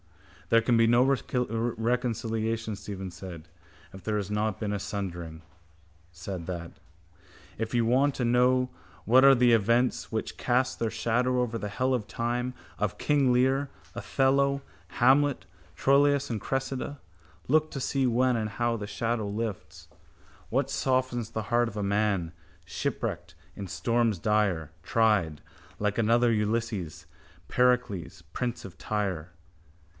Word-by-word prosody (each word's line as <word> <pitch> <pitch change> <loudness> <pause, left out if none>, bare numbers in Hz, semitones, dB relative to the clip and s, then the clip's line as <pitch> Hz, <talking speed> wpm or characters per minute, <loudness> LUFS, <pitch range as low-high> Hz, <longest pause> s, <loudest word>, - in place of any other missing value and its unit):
—There 115 0 +5
can 120 +1 +3
be 115 0 +5
no 120 +2 +5
reconciliation, 115 -3 -1
Stephen 95 -1 -7
said, 85 -3 -9 0.5
if 95 - -11
there 110 -1 -1
has 100 -1 -3
not 105 -1 -1
been 105 -2 -2
a 100 - -2
sundering. 85 -5 -5 0.7
Said 85 0 -6
that. 85 -2 -5 0.9
—If 115 +1 -3
you 120 -1 +3
want 135 +4 +3
to 125 - -1
know 125 +1 +3 0.4
what 125 +5 +6
are 135 0 +8
the 120 -1 +4
events 115 +3 +2
which 110 - -3
cast 125 +1 0
their 115 - 0
shadow 120 +3 0
over 120 -2 -1
the 105 -2 -4
hell 130 +6 0
of 115 -5 -1
time 120 +2 -2 0.3
of 105 -2 -1
King 140 -4 +2
Lear, 130 +3 +2 0.3
Othello, 140 +1 +1 0.4
Hamlet, 135 +3 +4 0.3
Troilus 140 +1 +3
and 110 -4 -3
Cressida, 135 +1 -3 0.5
look 155 +3 +2
to 135 - -4
see 135 +1 0
when 125 +1 +2
and 110 -2 -1
how 120 +1 -1
the 105 -2 -5
shadow 110 0 -2
lifts. 105 -1 -5 0.6
What - - 0
softens 130 -3 0
the 110 -1 -4
heart 120 +1 +1
of 105 - -10
a 105 - -1
man, 100 -4 0 0.3
shipwrecked - - -4 0.2
in 100 - -6
storms 115 0 +1
dire, 100 -6 0
Tried, 105 -9 +2 0.4
like 105 +1 0
another 115 +2 +3
Ulysses, 105 -5 -2 0.4
Pericles, 125 -8 0
prince 125 -1 -3
of 90 -4 -11
Tyre? 95 -6 -2
115 Hz, 140 wpm, -28 LUFS, 105-125 Hz, 0.9 s, are